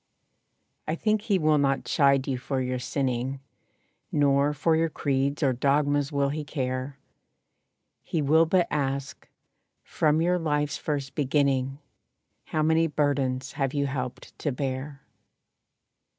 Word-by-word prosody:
I 155 - 0
think 215 +3 +1
he 205 -2 +1
will 155 -3 +3
not 135 -1 +1
chide 140 -2 +3
you 130 -2 -1
for 135 +1 -2
your 125 0 -2
sinning, 130 0 -2 0.7
Nor 140 0 +3
for 160 +2 +1
your 165 +1 +1
creeds 140 0 -1
or 135 -2 +3
dogmas 145 +2 +1
will 140 -1 +1
he 150 +2 -3
care; 130 -1 -3 1.0
He 165 - -3
will 160 +3 +4
but 180 0 +3
ask, 140 -1 -3 0.5
"From 155 0 +1
your 180 +2 +2
life's 150 -2 0
first 140 -3 -3
beginning 135 -2 +1 0.7
How 155 - -1
many 160 +1 +3
burdens 140 -3 0
have 135 0 -2
you 140 0 +1
helped 130 -2 -5
to 150 - -1
bear?" 135 +1 -4
140 Hz, 135 wpm, -26 LUFS, 135-150 Hz, 1.0 s, will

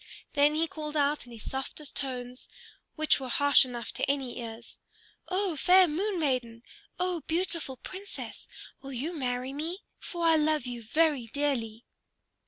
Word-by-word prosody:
Then 290 0 +4
he 320 +1 +3
called 305 -1 -4
out 290 -2 +1
in - - -12
his 225 -2 -9
softest 270 +2 -4
tones, 250 -2 -4 0.5
which 310 -2 +3
were 260 -1 -5
harsh 285 +2 +7
enough 240 -2 -5
to - - -1
any 270 -4 -1
ears, 230 0 -8 0.5
"O 375 -2 0
fair 365 +5 +6
Moon 370 +5 -1
Maiden, 245 -6 -1 0.4
O 360 -2 0
beautiful 330 -5 -1
Princess, 390 +8 -7 0.3
will 275 0 -7
you 285 +8 -2
marry 255 -3 -2
me? 330 +7 -3 0.2
For 345 -2 -3
I 325 -1 +6
love 305 -3 +2
you 245 -1 -5
very 285 +1 +2
dearly." 240 -4 -1
285 Hz, 155 wpm, -29 LUFS, 250-325 Hz, 0.5 s, harsh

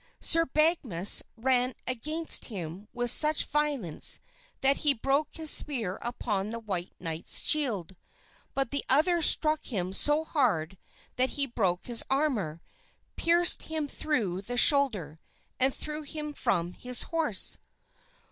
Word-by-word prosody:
Sir 330 0 +2
Badgemagus 265 - +2 0.2
ran 250 +1 0
against 305 +7 0
him 190 -2 -8
with 245 -1 0
such 305 +3 +4
violence 285 - +1 0.4
that 275 +1 +3
he 290 -2 +2
broke 275 +6 -1
his 315 -2 +2
spear 225 -10 +2
upon 210 -4 -4
the 230 - -5
white 190 -6 -6
knight's 165 -2 -2
shield; 215 - -1 0.6
but 270 -3 -2
the 285 - -2
other 335 +6 +3
struck 310 0 +5
him 185 -6 -4
so 295 +9 0
hard 195 - -2 0.4
that 255 +1 +1
he 280 - +3
broke 190 -8 -2
his 240 -2 -1
armor, 240 - -2 0.5
pierced 345 +1 +3
him 315 -2 -3
through 220 - -3
the 245 +5 -7
shoulder 220 - +4 0.4
and 260 +1 +2
threw 300 +3 -6
him 300 0 -7
from 175 -8 -2
his 250 +4 -2
horse. 320 - +1
255 Hz, 135 wpm, -27 LUFS, 195-300 Hz, 0.6 s, struck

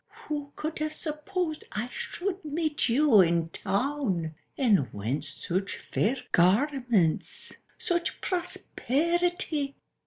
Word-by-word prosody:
Who 290 -2 -3
could 310 +1 -4
have 310 0 -1
supposed 315 +1 -3
I 215 +3 -2
should 380 0 -4
meet 305 -3 0
you 245 -4 +6
in 170 -2 +2
Town? 200 - -1 0.2
And 200 - +3
whence 120 +9 -1
such 185 +8 -2
fair 240 +6 0
garments, 240 - +2 0.3
such 345 -1 -1
prosperi 345 - 0
ty?" 285 -6 +1
280 Hz, 105 wpm, -28 LUFS, 195-315 Hz, 0.3 s, you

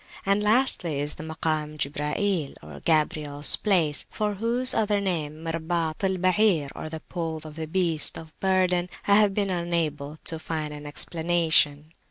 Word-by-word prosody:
And 200 +1 +2
lastly 210 - +3
is 145 +1 -2
the - - -9
Makam 155 -1 -3
Jibrail 150 - -3
(Gabriel's 150 -2 +2
place), 170 -8 +1
for 210 -1 -2
whose 235 +5 +2
other 210 -2 +1
name, 160 -5 -3
Mirbaat 165 0 -2
al 190 -1 +1
Bair, 185 -5 +2 0.2
"the 160 0 -7
Pole 165 -3 -4
of 155 -1 -10
the 160 -1 -5
Beast 165 -2 0
of 160 -1 -11
Burden," 185 -2 +1 0.2
I 200 0 +6
have 205 -2 +4
been 200 -2 0
unable 160 -4 -2
to 160 - 0
find 155 -2 -4
an 150 0 -8
explanation. 160 -1 +2
165 Hz, 150 wpm, -25 LUFS, 150-190 Hz, 0.2 s, I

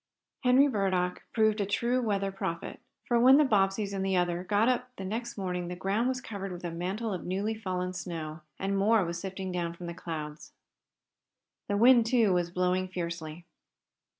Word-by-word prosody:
Henry 255 +3 +6
Burdock 185 -7 0
proved 220 -1 +2
a - - +1
true 240 +5 +1
weather 200 -4 0
prophet, 170 -3 -4 0.3
for 240 -1 +2
when 260 +3 +8
the 300 - +6
Bobbseys 200 -3 +1
and 195 -1 -2
the 190 -1 +1
other 175 0 0
got 205 +4 +2
up 250 0 +1
the 190 - -6
next 235 +4 -4
morning 180 -2 -3
the 180 - -4
ground 200 +6 0
was 260 0 -1
covered 195 -4 -6
with 180 0 -8
a 175 - -3
mantle 190 +6 -3
of 180 - -5
newly 195 +4 -1
fallen 185 -4 -3
snow, 160 -3 -5 0.2
and 195 +1 -1
more 205 0 +3
was 170 0 -4
sifting 190 -1 -5
down 170 -1 -2
from 175 - -9
the 170 - -5
clouds. 155 -3 -7 1.1
The 200 - 0
wind, 235 +1 +6
too, 225 -5 +3
was 175 -1 +1
blowing 180 +1 0
fiercely. 170 -2 -5
195 Hz, 185 wpm, -29 LUFS, 180-220 Hz, 1.1 s, when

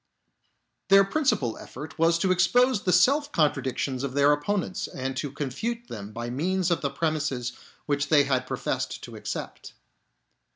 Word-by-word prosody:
Their 195 0 +7
principal 195 - 0
effort 155 +1 -9
was 165 +1 +4
to 185 +2 +1
expose 215 +6 +3
the 185 - 0
self 280 - +4
contradictions 135 -3 0
of 135 -1 -4
their 145 +1 +5
opponents 185 +5 -2
and 130 0 -4
to 145 0 -3
confute 225 - -4
them 105 -1 -7
by 120 +2 -5
means 180 +6 0
of 170 - +1
the 140 - 0
premises 140 -5 -2 0.3
which 145 -1 0
they 150 -2 +6
had 130 -2 0
professed - - -3
to - - -9
accept. - - -6
150 Hz, 155 wpm, -26 LUFS, 135-190 Hz, 0.3 s, Their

